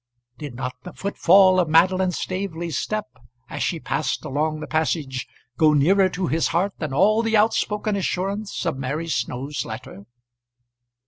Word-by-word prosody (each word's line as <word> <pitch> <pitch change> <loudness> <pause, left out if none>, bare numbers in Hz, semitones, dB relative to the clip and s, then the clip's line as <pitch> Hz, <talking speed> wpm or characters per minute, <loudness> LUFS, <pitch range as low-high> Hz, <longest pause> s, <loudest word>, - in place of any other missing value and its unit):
Did 145 -5 -7
not 125 0 -4
the 180 - -9
footfall 190 -1 +4
of 175 -3 +1
Madeline 185 +4 +4
Staveley's 175 -4 -4
step 215 +9 -2 0.5
as - - -4
she - - -1
passed - - -2
along 155 +3 -1
the - - -5
passage 150 -5 -1 0.3
go 155 +1 +5
nearer 185 +7 +4
to 185 0 -3
his 160 +1 +1
heart 185 +4 0
than 155 -3 -3
all 205 +10 +3
the 225 -1 +2
outspoken 210 -1 +1
assurance 195 +2 -2
of 135 - -2
Mary 145 +5 -3
Snow's 140 -2 -3
letter? 110 -3 -9
170 Hz, 150 wpm, -23 LUFS, 150-195 Hz, 0.5 s, go